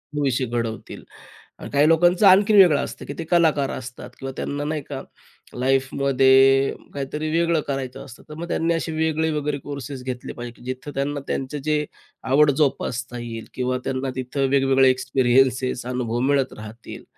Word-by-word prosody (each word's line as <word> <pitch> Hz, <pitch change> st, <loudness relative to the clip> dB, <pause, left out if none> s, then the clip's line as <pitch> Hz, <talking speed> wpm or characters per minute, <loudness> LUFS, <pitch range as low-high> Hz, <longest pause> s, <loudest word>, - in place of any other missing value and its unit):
भविष्य 135 Hz, -3 st, 0 dB
घडवतील 115 Hz, -1 st, -4 dB, 0.6 s
आणि -, -, -8 dB
काही 145 Hz, +2 st, +4 dB
लोकांचं 175 Hz, +4 st, +4 dB
आणखीन 205 Hz, +3 st, +6 dB
वेगळं 175 Hz, -7 st, +7 dB
असतं -, -, -8 dB
की 140 Hz, -, -6 dB
ते -, -, -2 dB
कलाकार 155 Hz, -5 st, +3 dB
असतात 125 Hz, 0 st, -8 dB
किंवा 135 Hz, 0 st, -5 dB
त्यांना 145 Hz, +1 st, -3 dB
नाही 150 Hz, 0 st, -2 dB
का 135 Hz, -2 st, -5 dB, 0.5 s
लाईफमध्ये 135 Hz, +1 st, +3 dB, 0.2 s
काहीतरी 150 Hz, +3 st, -4 dB
वेगळं 170 Hz, -1 st, +2 dB
करायचं 135 Hz, -1 st, -4 dB
असतं. 125 Hz, -3 st, -14 dB
तर -, -, -8 dB
मग 170 Hz, +2 st, -6 dB
त्यांनी 165 Hz, +1 st, +1 dB
असे 165 Hz, 0 st, -2 dB
वेगळे 160 Hz, 0 st, 0 dB
वगैरे 150 Hz, -1 st, -2 dB
कोर्सेस 140 Hz, -2 st, -7 dB
घेतले 125 Hz, -1 st, -5 dB
पाहिजे, 120 Hz, 0 st, -9 dB
जिथं 130 Hz, +3 st, -6 dB
त्यांना 140 Hz, +1 st, -2 dB
त्यांचं 135 Hz, +2 st, -3 dB
जे 150 Hz, -1 st, +1 dB, 0.5 s
आवड 145 Hz, +1 st, +5 dB
जोपासता 125 Hz, -3 st, -1 dB
येईल 115 Hz, -1 st, -7 dB
किंवा 125 Hz, 0 st, -1 dB
त्यांना 130 Hz, 0 st, -2 dB
तिथं 130 Hz, +1 st, -1 dB
वेगवेगळे 135 Hz, -1 st, +4 dB
एक्सपिरियन्सेस, 130 Hz, 0 st, +1 dB
अनुभव 120 Hz, -2 st, -2 dB
मिळत 135 Hz, -2 st, +1 dB
राहतील. 110 Hz, +2 st, -10 dB
135 Hz, 155 wpm, -22 LUFS, 130-150 Hz, 0.6 s, वेगळं